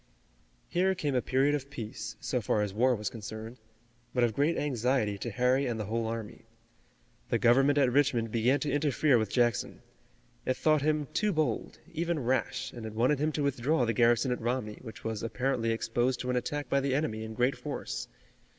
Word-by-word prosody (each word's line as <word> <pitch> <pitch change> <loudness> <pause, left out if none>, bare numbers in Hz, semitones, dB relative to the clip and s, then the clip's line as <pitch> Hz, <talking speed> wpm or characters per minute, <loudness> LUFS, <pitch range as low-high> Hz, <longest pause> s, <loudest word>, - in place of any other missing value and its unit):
Here 190 +2 +1
came 150 -6 -1
a 125 - +2
period 135 +4 +2
of 140 -2 -3
peace 110 -4 -6
so 125 - -1
far 105 0 +1
as 100 -2 -3
war 125 +4 +3
was 105 -2 -3
concerned, 110 +2 -8 0.6
but 125 - +3
of 115 -2 +2
great 145 +7 +1
anxiety 125 -5 0
to 120 - -3
Harry 125 +4 +2
and 115 -2 -2
the 105 - -2
whole 115 +2 -1
army. 115 -2 -5 0.9
The - - +2
government 135 +4 +4
at 135 -3 +4
Richmond 125 -5 +2
began 120 +5 +2
to 150 - -1
interfere 145 -2 +3
with 110 -2 -1
Jackson. 120 -2 0 0.6
It 130 - -1
thought 155 -2 +3
him 150 -1 +1
too 210 -1 +1
bold, 155 - -1 0.2
even 170 +1 -1
rash, 130 0 -1
and 115 -2 -6
it 110 - -8
wanted 130 +5 +2
him 155 +2 +1
to 145 - -1
withdraw 140 0 +1
the 115 - 0
garrison 120 +2 +3
at 125 - -2
Romney, 120 -2 -2
which 115 -3 -10
was 110 -2 -3
apparently 120 0 -1
exposed 120 +2 0
to 125 - -2
an - - 0
attack 145 +3 -2
by 140 - +2
the 135 -1 0
enemy 110 -7 -1
in 110 0 -7
great 125 +3 +2
force. - - -5
125 Hz, 195 wpm, -30 LUFS, 115-140 Hz, 0.9 s, government